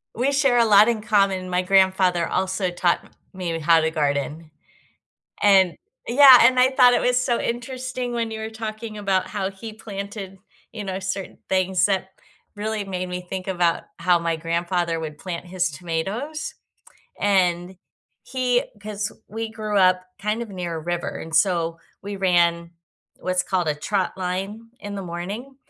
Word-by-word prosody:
We 255 +5 +1
share 275 -3 +3
a 235 - +5
lot 210 0 +7
in 230 -2 0
common, 195 -4 +1
my 180 0 +1
grandfather 185 -2 +3
also 185 0 -1
taught 175 0 +1 0.3
me 175 -3 -3
how 165 +1 +5
to 160 0 0
garden 150 +1 -2 0.9
and 190 -4 +5 0.3
yeah, 260 0 +9
and 255 +2 +5
I 255 +1 +5
thought 250 -2 +6
it - - +2
was 250 0 +2
so 245 -1 0
interesting 250 +1 -4
when 230 -1 -2
you 220 - -5
were 220 0 -4
talking 220 0 -6
about 195 -2 0
how 195 -2 -3
he 205 +3 -9
planted, 200 -2 -7 0.3
you 210 -2 -6
know, 190 -1 -4
certain 190 0 -5
things 185 -1 +2
that 190 -1 -1 0.4
really 215 0 -3
made 185 -2 -4
me 180 0 -4
think 190 0 -5
about 175 -3 +1 0.2
how 175 0 +3
my 165 -1 -1
grandfather 170 +1 -1
would 155 -2 -6
plant 180 0 -6
his 175 0 -1
tomatoes, 190 - -4 0.7
and 185 -2 +1 0.5
he 250 0 0 0.2
'cause 210 -1 -4 0.2
we 225 +1 -4
grew 215 -1 -3
up 185 -1 +4 0.2
kind 210 +3 -2
of 235 - -7
near 180 -4 -4
a - - -4
river, 175 +2 -3
and 160 -1 -3
so 170 -3 +2 0.2
we 200 0 -5
ran 170 -3 +2 0.5
what's 185 0 0
called 180 -4 -1
a 150 - +1
trot 185 +6 -2
line 195 +5 -4
in 205 0 -6
the 195 - -4
morning 195 +10 -6
190 Hz, 165 wpm, -23 LUFS, 175-220 Hz, 0.9 s, yeah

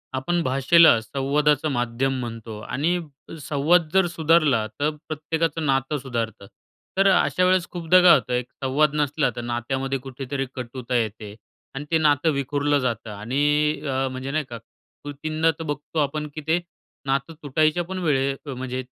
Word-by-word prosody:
आपण 175 +6 0
भाषेला 135 +1 +5
संवादाचं 145 +5 +1
माध्यम 120 +1 -1
म्हणतो 115 -2 -6
आणि 160 +10 -1 0.4
संवाद 155 +4 +2
जर 190 -2 +4
सुधारला, 155 -8 +2
तर 145 +1 +2 0.2
प्रत्येकाचं 160 +1 -2
नातं 135 +1 0
सुधारतं. 115 -6 -4 0.5
तर 195 - +5
अशा 185 -1 +2
वेळेस 185 -1 +2
खूपदा 175 +1 +4
काय 180 -1 +8
होत, 130 - -2
एक 125 0 0 0.2
संवाद 145 +3 +2
नसला 150 0 +1
तर 120 - -4
नात्यामध्ये 130 +3 -2
कुठेतरी 135 +1 -4
कटुता 125 0 -5
येते 110 -2 -2 0.4
आणि 145 +2 -5
ते 165 - +4
नातं 150 0 +3
विखुरलं 145 +1 0
जातं 120 -4 -3
आणि 115 +8 -2 0.4
अ, 135 0 0
म्हणजे, 130 +1 -5
नाही 155 +1 0
का, 120 - -6 0.5
कृतींना 155 +3 -1
तर - - -4
बघतो 145 +1 -4
आपण 150 +1 -1
की 155 - -5
ते 165 +2 +3 0.5
नातं 135 +3 -1
तुटायच्या 155 +4 +1
पण 185 +2 -5
वेळे 135 -3 +1 0.2
म्हणजे 130 0 -4
140 Hz, 150 wpm, -23 LUFS, 130-155 Hz, 0.5 s, काय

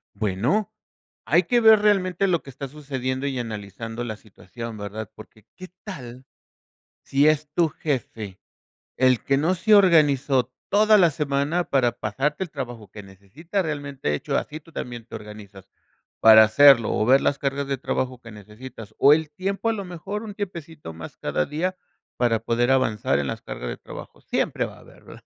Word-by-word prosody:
Bueno. 115 - 0 0.6
Hay 170 +3 +5
que 240 +7 +2
ver 220 -2 +7
realmente 195 -2 +2
lo 170 -3 +1
que - - -13
está 135 +1 -7
sucediendo 130 -2 -4
y 135 -2 -3
analizando 115 +1 -6
la 110 -3 -4
situación, 115 +2 -10
¿verdad? 105 0 -7
Porque, 110 0 -15
¿qué 185 0 -10 0.2
tal, 130 - -9 0.8
si 140 +2 +3
es 155 -1 +1
tu 170 -2 +3
jefe, 115 - -4 0.6
el 130 -2 +3
que 135 -1 +2
no 165 +6 +1
se 215 +4 +3
organizó 145 - +4 0.2
toda 215 +1 +5
la 175 - +6
semana, 145 +4 -1
para 125 -6 +1
pasarte 135 - -2
el 175 - -12
trabajo 120 -7 -7
que 105 - -10
necesita?, 100 - -5
realmente 145 - -3
hecho 75 - -2
así 155 +1 -4
tú 165 - -19
también 120 -6 -7
te - - -13
organizas, 105 -2 -10 0.5
para 110 0 +9
hacerlo 115 +1 +6
o 110 - 0
ver 135 +2 +5
las 140 - +1
cargas 140 0 -2
de 135 - -2
trabajo 130 -1 -3
que 115 -2 -12
necesitas, 110 +1 -11
o 145 +2 +7
el 155 -1 -2
tiempo, 195 +7 -2
a - - +1
lo 200 -3 -5
mejor 195 +5 -6
un 210 -2 -8
tiempecito 165 - -7
más 80 0 -10
cada 75 - -1
día, 180 +5 -2 0.4
para 115 -2 +2
poder 120 +2 0
avanzar 110 - +1
en 70 - -2
las - - -4
cargas 60 - -7
de - - -7
trabajo. - - -11
Siempre - - -1
va - - -11
a - - -17
haber, - - -18
¿verdad?, - - -14
135 Hz, 180 wpm, -24 LUFS, 110-165 Hz, 0.8 s, para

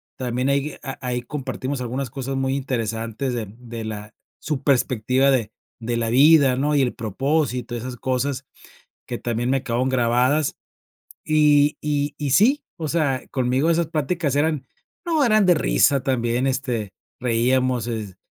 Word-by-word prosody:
también 125 +1 -1
ahí, 140 +1 0
a 135 +1 -6
ahí 125 -1 -1
compartimos 135 0 -4
algunas 125 +2 -3
cosas 135 +2 -4
muy 135 0 0
interesantes 115 -1 -2
de 115 - -3
de 115 -2 -7
la 105 -1 -7 0.3
su 150 -3 -3
perspectiva 130 0 +2
de 120 -5 0 0.3
de 120 +1 -2
la 115 -1 -1
vida, 140 +1 +6
¿no?, 145 +3 0
y 140 - +3
el 125 - +1
propósito, 125 +2 -1
esas 125 +1 -5
cosas 130 +2 -2 0.6
que 120 - -4
también 120 +1 -2
me 135 0 +1
quedaron 125 +1 0
grabadas. 130 +4 +2 0.7
Y 150 -1 +4
y 145 -1 -1
y, 145 -2 -3
sí, 250 - +4
o 160 -2 -4
sea, 145 -5 0
conmigo 130 +4 +1
esas 170 -1 +2
pláticas 155 -1 -1
eran, 150 -2 0 0.4
no, 325 -4 +1
eran 215 -4 +4
de 180 - +6
risa 140 -3 +3
también, 125 -1 0
este, 125 -7 -2 0.3
reíamos, 125 0 +1
es, 105 -5 -5
130 Hz, 155 wpm, -22 LUFS, 120-145 Hz, 0.7 s, vida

